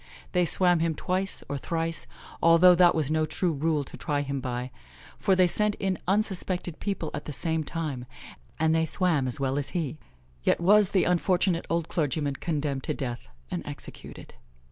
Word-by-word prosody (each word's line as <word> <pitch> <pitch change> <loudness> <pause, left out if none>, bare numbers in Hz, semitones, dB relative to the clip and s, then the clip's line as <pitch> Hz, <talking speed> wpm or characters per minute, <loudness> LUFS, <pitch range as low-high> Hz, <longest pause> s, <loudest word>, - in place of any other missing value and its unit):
They 180 -1 +2
swam 175 +1 +4
him 165 -1 0
twice 185 +5 -1
or 145 - -3
thrice, 165 +2 -3 0.3
although 170 +2 +7
that 175 0 +5
was 155 -2 0
no 155 0 +1
true 175 +3 0
rule 150 0 0
to - - -11
try 145 -3 -1
him 140 -1 -3
by, 125 0 -4 0.5
for 190 - +3
they 185 0 +5
sent 210 +4 +1
in 190 -2 -2
unsuspected 190 -4 -1
people 195 -6 -3
at 145 - -5
the - - -5
same 160 +2 -1
time, 150 -6 -4 0.5
and 160 0 +3
they 160 0 +2
swam 160 -7 +1
as 125 - -1
well 135 +1 0
as 140 - -2
he; 155 -2 -3 0.4
yet - - +2
was 200 +3 +5
the 190 - +2
unfortunate 180 0 +1
old 170 -1 0
clergyman 145 -4 -1
condemned 145 -4 -2
to - - -2
death 125 -3 -5 0.2
and - - -3
executed. - - -8
165 Hz, 180 wpm, -27 LUFS, 145-180 Hz, 0.5 s, although